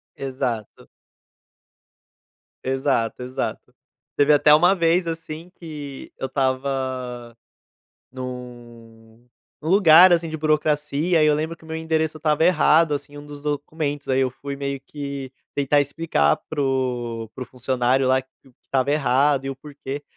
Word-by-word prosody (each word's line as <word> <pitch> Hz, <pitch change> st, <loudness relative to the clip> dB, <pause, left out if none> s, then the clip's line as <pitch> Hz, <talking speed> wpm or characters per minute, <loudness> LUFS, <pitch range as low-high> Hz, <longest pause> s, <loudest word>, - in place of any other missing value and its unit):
Exato. 130 Hz, -5 st, -4 dB, 1.8 s
Exato, 130 Hz, -3 st, 0 dB
exato. 130 Hz, +1 st, -5 dB, 0.4 s
Teve 145 Hz, +1 st, +5 dB
até 150 Hz, +1 st, +6 dB
uma 175 Hz, +5 st, +6 dB
vez, 170 Hz, 0 st, +2 dB
assim, 165 Hz, +1 st, -6 dB
que 145 Hz, -5 st, -8 dB
eu 135 Hz, -, -3 dB
estava 130 Hz, -3 st, -2 dB, 0.8 s
num 120 Hz, -2 st, -10 dB, 0.3 s
num 155 Hz, -, -4 dB
lugar, 180 Hz, -1 st, +8 dB
assim, 170 Hz, -1 st, +3 dB
de 160 Hz, -, -4 dB
burocracia, 155 Hz, +1 st, +1 dB
e -, -, +5 dB
eu 150 Hz, -, +4 dB
lembro 155 Hz, +2 st, -2 dB
que 165 Hz, -, -23 dB
o -, -, -14 dB
meu 160 Hz, -, -4 dB
endereço 160 Hz, -1 st, -1 dB
estava 155 Hz, 0 st, +1 dB
errado, 165 Hz, -2 st, +4 dB
assim, 145 Hz, 0 st, -5 dB
em -, -, -9 dB
um 145 Hz, -, -10 dB
dos 145 Hz, -1 st, -10 dB
documentos. 145 Hz, 0 st, -3 dB
Aí, 130 Hz, 0 st, +2 dB
eu 130 Hz, -1 st, +2 dB
fui 140 Hz, +2 st, -7 dB
meio 140 Hz, 0 st, -3 dB
que 140 Hz, -2 st, -6 dB, 0.2 s
tentar 145 Hz, +1 st, +3 dB
explicar 140 Hz, -, +1 dB
pro 125 Hz, -5 st, -2 dB
pro 130 Hz, -, -6 dB
funcionário 130 Hz, +1 st, 0 dB
lá 130 Hz, 0 st, +3 dB
que 130 Hz, -, -27 dB, 0.4 s
estava 135 Hz, +1 st, 0 dB
errado 140 Hz, -1 st, +2 dB
e -, -, -2 dB
o 135 Hz, -, -4 dB
porquê. 140 Hz, 0 st, -8 dB
140 Hz, 145 wpm, -23 LUFS, 130-155 Hz, 1.8 s, lugar